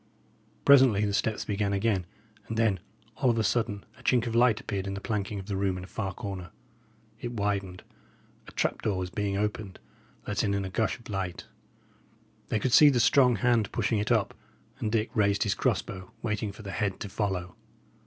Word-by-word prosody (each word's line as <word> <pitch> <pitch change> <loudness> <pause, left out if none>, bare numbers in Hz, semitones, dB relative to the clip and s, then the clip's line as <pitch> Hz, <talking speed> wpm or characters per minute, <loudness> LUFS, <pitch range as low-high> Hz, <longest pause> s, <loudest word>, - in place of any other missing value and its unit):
Presently 130 -7 +6
the 100 - -1
steps 110 +2 0
began 100 -1 -1
again, 100 -3 0 0.4
and 115 - -4
then, 110 -5 +2 0.4
all 125 +2 +2
of 115 - +2
a 110 - +2
sudden, 110 -2 0
a - - -14
chink 125 -2 +2
of 115 - -3
light 120 -2 +4
appeared 100 -2 -4
in 100 - -3
the - - -4
planking 105 -1 -3
of 95 - -7
the 100 -1 -3
room 95 -1 0
in 90 - -7
a - - -9
far 95 -1 -3
corner. 95 -1 -6 0.7
It 120 0 -5
widened; 100 -4 -2 0.6
a - - -10
trap - - -1
door 100 -3 0
was 90 0 -3
being 100 -1 -1
opened, 105 -1 -3 0.5
letting 105 -1 0
in 100 -1 -1
a 95 - -6
gush 110 +3 0
of 120 - -15
light. 95 -4 -4 1.0
They - - 0
could 120 +3 -1
see 150 +2 +9
the 130 -4 +2
strong 125 +2 +5
hand 115 -1 +2
pushing 110 - 0
it 105 +3 -1
up; 110 -4 +2 0.5
and 105 - -2
Dick 110 0 0
raised 100 -2 +2
his 105 - +1
cross - - +1
bow, 95 -1 -9
waiting 105 -2 -1
for 110 +2 -12
the 100 - -6
head 100 -1 -2
to - - -3
follow. 95 -3 -3
105 Hz, 205 wpm, -28 LUFS, 95-115 Hz, 1.0 s, see